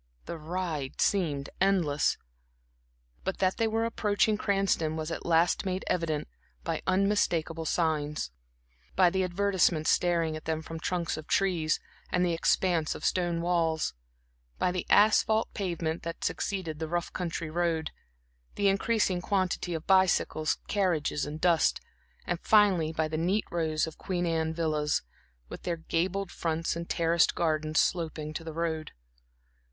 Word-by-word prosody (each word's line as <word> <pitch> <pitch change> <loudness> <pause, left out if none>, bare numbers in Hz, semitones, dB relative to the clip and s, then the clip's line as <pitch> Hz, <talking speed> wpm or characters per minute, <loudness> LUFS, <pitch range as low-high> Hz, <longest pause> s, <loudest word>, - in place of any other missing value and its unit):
The 165 - -6
ride 155 -4 -4
seemed 150 -8 +1
endless, 175 -7 +2 1.1
but 190 - -2
that 185 0 +1
they 225 - +2
were 225 +1 0
approaching 215 -1 +1
Cranston 195 -6 +1
was 160 0 -4
at - - -5
last 170 +1 +3
made 185 0 -2
evident 160 -4 -1 0.4
by - - -2
unmistakable 185 -4 +1
signs; 150 - -1 0.6
by 180 -1 +5
the 190 +1 +1
advertisements 180 -3 +2
staring 170 -3 +1
at 155 - -8
them 160 0 -2
from 165 0 -7
trunks 170 -1 -2
of 155 - -8
trees 175 -5 +1 0.3
and 180 0 +2
the 175 - +1
expanse 165 -1 +1
of - - -6
stone 175 -2 +1
walls; 165 - +1 0.6
by 180 - +1
the 180 0 -3
asphalt 220 +1 +4
pavement 170 -5 -2
that 165 0 -6
succeeded 170 -6 -2
the 160 - -3
rough 175 0 -2
country 170 -3 -3
road, 165 -2 0 0.6
the 200 -1 +3
increasing 195 -2 +1
quantity 185 -2 -1
of 160 - -5
bicycles, 185 -5 +3
carriages 175 -8 0
and 150 +1 -6
dust; 170 -2 +3 0.5
and 175 -1 -2
finally 195 -7 +4
by 160 -1 0
the 155 0 -3
neat 185 +6 +1
rows 160 -2 0
of 160 -1 -10
Queen 180 -2 -2
Anne 160 -1 0
villas, 155 - 0 0.4
with - - -9
their 170 -1 -2
gabled 175 +4 -1
fronts 165 0 -1
and 170 0 -6
terraced 170 0 +2
gardens 155 -1 +1
sloping 155 -3 -1
to 165 - -5
the 160 -1 -6
road. 160 -2 -2
170 Hz, 145 wpm, -29 LUFS, 160-185 Hz, 1.1 s, by